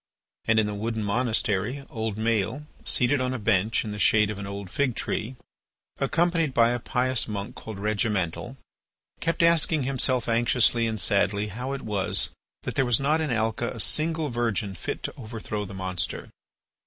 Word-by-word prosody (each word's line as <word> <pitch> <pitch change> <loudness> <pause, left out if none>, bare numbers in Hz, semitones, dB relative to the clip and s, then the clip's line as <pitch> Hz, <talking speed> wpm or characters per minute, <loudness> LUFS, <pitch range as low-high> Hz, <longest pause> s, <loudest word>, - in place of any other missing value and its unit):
And 110 - +3
in 110 - +3
the 105 - -3
wooden 110 +1 -2
monastery 115 +2 0
old 110 -2 -3
Maël, 115 +5 0 0.2
seated 130 +1 +3
on 130 0 -1
a - - -1
bench 110 0 +1
in 105 - -4
the 105 - -5
shade 105 +1 +4
of 105 - -6
an 100 - -5
old 100 -2 -6
fig 135 -5 0
tree, 120 +5 -3 0.6
accompanied 165 0 +1
by 115 0 +5
a 120 - -1
pious 125 +1 +1
monk 100 -2 -4
called 110 -3 -8
Regimental, 105 +2 -1 0.6
kept 165 0 0
asking 165 -3 +4
himself 130 -2 0
anxiously 115 0 +3
and 110 -1 -2
sadly 100 +1 +2
how 125 +6 -5
it 135 - -5
was 105 -3 0 0.3
that - - -3
there 135 - +2
was 120 -3 +3
not 150 +3 +2
in 155 - -1
Alca 115 0 0
a 115 - -7
single 160 +5 +2
virgin 115 -4 -1
fit 85 - -5
to - - -3
overthrow 110 -3 -5
the 95 0 -9
monster. 95 -1 -2
115 Hz, 175 wpm, -26 LUFS, 105-130 Hz, 0.6 s, by